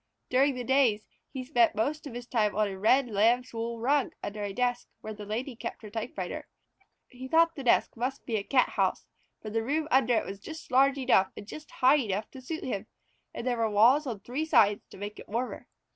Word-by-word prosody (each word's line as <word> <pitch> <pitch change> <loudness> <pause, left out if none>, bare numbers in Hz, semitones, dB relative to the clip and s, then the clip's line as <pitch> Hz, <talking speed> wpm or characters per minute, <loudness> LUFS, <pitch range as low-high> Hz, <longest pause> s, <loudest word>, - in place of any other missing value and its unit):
During 270 +2 +3
the 250 - -4
days 245 -5 +2 0.2
he 260 - -6
spent 245 -4 +2
most 295 +8 -1
of 245 - -9
his 245 0 -6
time 220 -4 0
on 210 0 +2
a 195 - -5
red 250 +6 +4
lamb's 235 +4 +2
wool 230 +1 -3
rug 275 +4 +1
under 210 +1 -5
a 200 - -3
desk 245 +3 -1
where 215 - -6
the 210 -1 -9
Lady 240 +5 -3
kept 230 - -7
her 210 - -9
typewriter. 225 +2 -5 0.6
He 255 0 -9
thought 330 +3 +4
the 275 - -6
desk 245 - +3
must 255 +4 -3
be 230 - -2
a 200 - -2
Cathouse, 255 +3 +1 0.4
for 215 - -6
the 225 +1 0
room 300 +6 -1
under 250 -2 +4
it - - 0
was 195 0 -7
just 315 +8 -10
large 270 +2 +4
enough 245 -8 +3
and - - -8
just 300 +8 -10
high 260 +4 +4
enough 215 -3 -3
to 265 - -10
suit 315 +5 -5
him, 215 -4 -4 0.4
and - - -7
there 245 -2 0
were 225 -1 +1
walls 240 +8 +4
on 220 -6 -4
three 255 +9 -3
sides 225 -10 +3
to - - -14
make 205 +2 -7
it - - -12
warmer. 240 +4 -3
245 Hz, 220 wpm, -29 LUFS, 215-265 Hz, 0.6 s, red